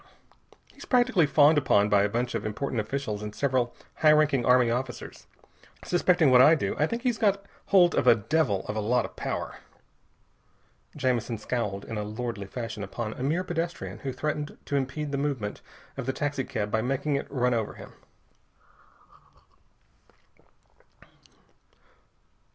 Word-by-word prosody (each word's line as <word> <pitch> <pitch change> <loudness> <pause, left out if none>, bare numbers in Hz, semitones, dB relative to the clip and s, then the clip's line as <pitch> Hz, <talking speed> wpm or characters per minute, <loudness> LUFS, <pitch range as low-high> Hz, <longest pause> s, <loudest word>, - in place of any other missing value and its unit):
"He's - - -12
practically 245 - +3
fawned 145 +1 +5
upon 105 -7 +3
by 105 -1 +4
a 100 - +1
bunch 120 +3 -2
of - - -2
important 115 +2 -2
officials 110 -3 -4
and 105 0 -6
several 130 -3 0 0.2
high 155 -1 +5
ranking 150 -4 +3
army 125 -1 +4
officers. 125 +1 -5 0.6
Suspecting 175 -4 +3
what 125 0 +7
I 155 +5 +7
do, - - -2
I 150 - +3
think 230 +5 -4
he's 245 -3 0
got 200 -2 +1 0.2
hold 180 -3 +5
of - - +1
a 120 - +8
devil 115 -3 0
of 105 - -4
a - - -1
lot 120 +4 +1
of - - -10
power." - - -4 1.4
Jamison 125 -5 -1
scowled 105 -3 -3
in 110 - -5
a - - -2
lordly 105 -1 -5
fashion 115 -1 -6
upon 110 +3 -5
a - - -9
mere 155 +7 0
pedestrian 165 - -4
who 135 +4 -4
threatened 150 +2 -4
to 145 - -3
impede 140 +2 -2
the 140 - -1
movement 130 -8 -3 0.3
of 135 -2 -6
the 130 - 0
taxicab 135 -8 -3
by 110 - +1
making 135 +4 -1
it 140 - -3
run 125 -2 +1
over 110 -3 -2
him. - - -12
130 Hz, 155 wpm, -27 LUFS, 110-150 Hz, 1.4 s, a